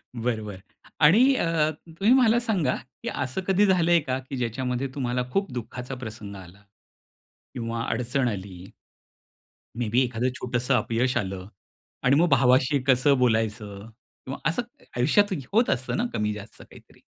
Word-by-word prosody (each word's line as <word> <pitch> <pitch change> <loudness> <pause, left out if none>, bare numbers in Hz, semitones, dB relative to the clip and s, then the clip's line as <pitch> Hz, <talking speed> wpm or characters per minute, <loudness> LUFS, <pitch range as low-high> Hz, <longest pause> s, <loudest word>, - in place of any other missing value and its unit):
बरं, 115 -2 -2
बरं. 100 -3 -8 0.4
आणि 220 - +6
अ, 165 -6 +1 0.2
तुम्ही 195 +8 +2
मला 240 -3 +5
सांगा, 195 - 0 0.3
की - - -2
असं 130 +7 -3
कधी 195 +2 +4
झालंय 175 -3 +4
का, 130 -4 -3
की 135 +1 -7
ज्याच्यामध्ये 125 +2 -2
तुम्हाला 125 -2 -1
खूप 195 0 0
दुःखाचा 125 +2 -6
प्रसंग 110 -5 -8
आला? 95 +1 -13 0.9
किंवा 115 -1 -3
अडचण 125 +3 0
आली. 95 -3 -7 1.1
मे 120 -2 -2
बी 120 +5 +3
एखादं 125 +1 -1
छोटंसं 125 +1 -1
अपयश 125 +1 0
आलं 95 -3 -5 0.6
आणि 130 +2 +4
मग 170 +4 +4
भावाशी 130 +1 +4
कसं 135 +2 +4
बोलायचं? 110 -3 -1 0.4
किंवा 135 +1 -5
असं 165 +9 0 0.3
आयुष्यात 175 +12 +3 0.2
होत 230 +4 +3
असतं 130 0 -1
ना 235 - 0
कमी 105 0 0
जास्त 105 0 -10
काहीतरी. - - -17
125 Hz, 145 wpm, -25 LUFS, 115-155 Hz, 1.1 s, आणि